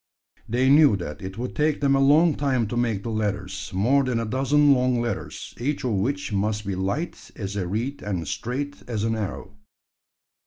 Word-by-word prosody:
They 125 +3 +2
knew 140 -5 +6
that 75 -5 -6
it 95 +1 -7
would 125 +2 -4
take 150 0 +1
them 140 -1 +3
a - - +3
long 150 +4 +5
time 135 -5 0
to 120 - -3
make 115 -5 0
the 115 - -3
ladders 105 -2 -3
more 120 +10 +3
than 125 -3 0
a 115 - -2
dozen 140 +5 +3
long 125 -1 +2
ladders 115 -4 -4
each 140 +4 -2
of 125 - 0
which 135 +6 -1
must 105 +1 -1
be 100 - -2
light 100 - -3
as 100 -2 -5
a 95 -3 -2
reed 115 +9 -3
and 95 -5 -3
straight 125 +8 -3
as 110 -4 -2
an 115 0 0
arrow. 100 -1 -5
115 Hz, 195 wpm, -24 LUFS, 100-140 Hz, -, knew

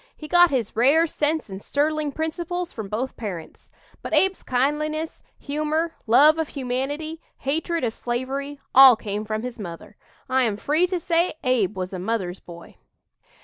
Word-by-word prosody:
He 305 - -8
got 350 +1 +6
his 250 -8 -2
rare 280 +8 +4
sense 310 0 -1
and 190 -1 -8
sterling 300 +2 0
principles 340 +3 -3
from 215 -4 -6
both 245 +6 -3
parents. 190 -8 -7 0.3
But - - -2
Abe's 385 0 +2
kindliness, 305 +5 -1 0.2
humor, 305 +3 -2
love 295 +8 +6
of 320 - 0
humanity, 285 +5 -3 0.2
hatred 320 +3 -2
of 230 -2 0
slavery, 270 +5 -4
all 265 -2 +10
came 210 0 -4
from 215 +1 -3
his 250 -2 -6
mother. 170 -5 -9 0.3
I 260 -1 +2
am 210 -3 -1
free 310 +10 +1
to 365 -1 -2
say 340 0 +1
Abe 225 -7 +1
was 185 +1 -4
a 185 - -4
'mother's 190 -2 -2
boy.'" 170 -1 -13
275 Hz, 160 wpm, -24 LUFS, 225-315 Hz, 0.3 s, all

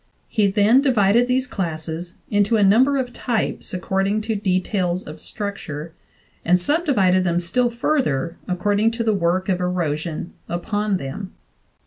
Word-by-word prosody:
He 210 -3 +2
then 210 +6 +4
divided 240 -3 +3
these 255 +1 +1
classes 170 -4 -4 0.2
into 205 +2 +3
a 210 - +3
num 215 +6 +6
ber 280 0 +1
of 250 -2 -2
types 230 -3 -2
according 195 +2 0
to 220 0 -2
details 185 -2 0
of 155 +1 -10
structure, 165 -6 -6 0.5
and 180 +2 +3
subdivided 200 - +2
them 170 -2 +1
still 240 +8 +1
further 235 - -1
according 205 +4 +1
to 230 0 -2
the 220 -1 +2
work 185 0 0
of 185 -2 +1
erosion 170 -2 -2 0.2
upon 205 +3 -1
them. 180 +7 -7
195 Hz, 145 wpm, -22 LUFS, 175-225 Hz, 0.5 s, num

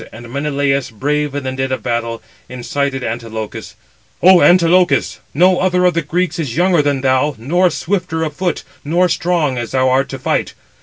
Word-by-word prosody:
And 120 +1 -11
Menelaus, 140 -1 -1
brave 145 +5 -2
in 145 - -3
the 130 - -3
din 130 0 -3
of 130 -5 -3
battle, 115 -2 -3 0.3
incited 135 +2 -3
Antilochus: 110 -2 -6 0.5
"O 185 0 +7
Antilochus, 175 -4 +3
no 180 +4 +3
other 180 -1 +2
of 180 - +3
the 170 - 0
Greeks 175 +3 -2
is 145 -5 -3
younger 175 -2 +3
than 145 -2 0
thou, 130 +2 +1
nor 175 +11 +1
swifter 165 -1 -2
of 155 -2 -3
foot, 175 0 -2 0.2
nor 175 +5 +2
strong, 165 -6 0
as 120 - -4
thou 130 0 +2
[art], 135 +2 +1
to 135 - -5
fight. 130 - -2
145 Hz, 175 wpm, -16 LUFS, 130-175 Hz, 0.5 s, O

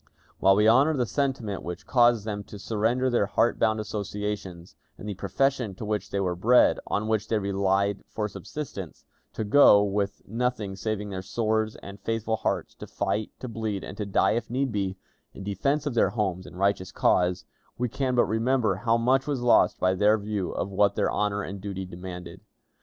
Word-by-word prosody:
While 95 0 +5
we 105 +2 +4
honor 135 +7 +5
the 125 - +1
sentiment 130 -7 -2
which 90 +3 -7
caused 120 -4 +3
them 105 -2 -4
to 105 - -10
surrender 115 +5 0
their 120 -5 +2
heart 120 - +1
bound 110 -1 +2
associations, 105 -4 -5 0.2
and 105 - -9
the 105 - -2
profession 115 +3 -1
to 105 - -7
which 105 -1 -2
they 100 - -2
were 90 -2 0
bred, 120 +8 +4
on 105 +1 -1
which 110 -1 0
they 110 - +1
relied 100 0 0
for 105 -1 -2
subsistence, 100 - -7 0.3
to - - -3
go, 105 -2 +6
with 100 0 -2
nothing 115 -3 -2
save 110 +2 -2
their 95 -2 -5
swords 110 +2 -1
and 100 +1 -9
faithful 115 0 -1
hearts, - - -2
to - - -9
fight, 110 0 -2
to 130 - -5
bleed, 110 -4 -3
and - - -7
to 105 - -3
die 100 - +3
if 115 0 -2
need 130 +2 -1
be, 100 -3 -2 0.4
in - - -8
defense 140 +10 -1
of 145 - -1
their 115 - +3
homes 95 -5 -2
and - - -12
a - - -10
righteous 95 -1 0
cause, 90 0 +1 0.3
we 125 - 0
can 130 +1 -1
but 120 - +4
remember 110 -2 +1
how 115 +3 +2
much 130 +4 +2
was 140 -4 -1
lost 120 -6 +4
by 95 0 +2
their 105 +3 +4
view 105 -3 -3
of 100 - -3
what 100 0 +2
their - - +1
honor 105 0 0
and 100 0 -7
duty 95 -1 -5
demanded. 90 0 -8
105 Hz, 195 wpm, -26 LUFS, 100-115 Hz, 0.4 s, go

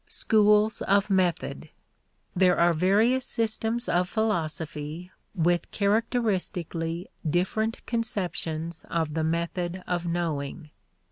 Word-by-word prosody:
Schools 210 -1 +3
of 200 +1 +2
Method. 185 -3 0 0.7
There 180 -1 +4
are 170 0 +4
various 210 +10 +3
systems 230 0 -1
of 180 +1 +1
philosophy 160 -5 -2 0.2
with 175 0 +1
characteristically 195 -6 -1 0.2
different 185 +7 -1
conceptions 170 -8 -2
of 160 -3 -1
the 160 0 0
method 170 +2 -2
of 175 -1 -2
knowing. 160 -2 -3
180 Hz, 95 wpm, -27 LUFS, 165-215 Hz, 0.7 s, There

